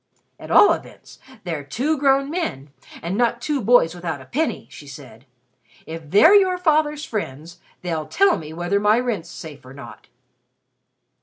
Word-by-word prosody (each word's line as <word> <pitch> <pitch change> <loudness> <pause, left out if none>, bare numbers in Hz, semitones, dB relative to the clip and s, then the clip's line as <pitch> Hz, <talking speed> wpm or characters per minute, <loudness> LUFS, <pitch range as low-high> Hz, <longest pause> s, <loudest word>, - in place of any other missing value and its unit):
"At - - -11
all 410 - +6
events, - - -11 0.2
they're 165 -5 -4
two 260 - -1
grown 275 0 +2
men, 150 - -4 0.3
and 175 +3 -3
not 235 +1 +1
two 285 +2 -2
boys 215 -7 +4
without 170 -4 -5
a 130 - -13
penny," 310 - -3
she 145 - -12
said. 135 -3 -13 0.6
"If 160 -2 -9
they're 315 - +6
your 380 -3 +4
father's 310 -3 +1
friends, 170 - -6 0.2
they'll 160 -4 -3
tell 390 -2 +2
me 155 -1 -9
whether 175 +5 -1
my 210 +3 +3
rent's 220 -9 -3
safe 155 -4 -10
or 130 +1 -13
not." 140 - -12
200 Hz, 160 wpm, -21 LUFS, -, 0.6 s, all